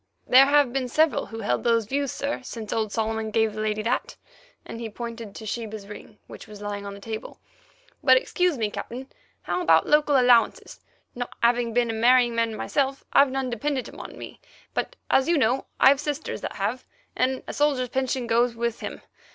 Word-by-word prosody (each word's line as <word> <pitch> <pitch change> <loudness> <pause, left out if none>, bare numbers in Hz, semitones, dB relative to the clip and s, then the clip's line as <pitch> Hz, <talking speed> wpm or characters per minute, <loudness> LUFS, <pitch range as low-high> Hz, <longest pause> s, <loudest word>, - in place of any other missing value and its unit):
"There 265 +2 +7
have 285 -3 +3
been 265 -2 -1
several 310 +5 +2
who 225 0 -7
held 125 0 -1
those 230 -2 +2
views, 275 +3 -1
sir, 280 -1 -3
since 230 -4 -6
old 220 -2 -1
Solomon 220 0 -2
gave 220 0 +1
the 215 - -4
lady 215 0 -1
that"—and 250 - -6
he 230 - -4
pointed 230 -1 -7
to 220 - -8
Sheba's 220 -2 -5
ring, 210 +1 -11
which - - -12
was 210 -1 -11
lying 205 -1 -5
on 200 - -7
the - - -11
table. 220 +1 -7 0.6
"But 260 -2 +7
excuse 355 +4 0
me, 215 -3 -1
Captain; 255 +6 -7 0.3
how - - -2
about 355 - +4
local 295 -2 +4
allowances? 245 -3 +3 0.3
Not 245 0 -4
having 240 0 +3
been 235 0 +1
a - - -4
marrying 240 +1 +4
man 230 -1 0
myself, 275 +3 -1
I've 280 - +6
none 265 -1 -2
dependent 260 +3 -2
upon - - -10
me, - - -10 0.3
but, - - -2 0.2
as 265 - +4
you 340 - +3
know, 255 0 +1
I've 270 +1 +6
sisters 295 0 -4
that - - -5
have, 215 +6 -2 0.3
and 260 +1 0
a - - -5
soldier's 275 -4 +1
pension 260 0 -1
goes 235 +1 +2
with 235 0 -2
him. - - -7
240 Hz, 190 wpm, -25 LUFS, 220-270 Hz, 0.6 s, There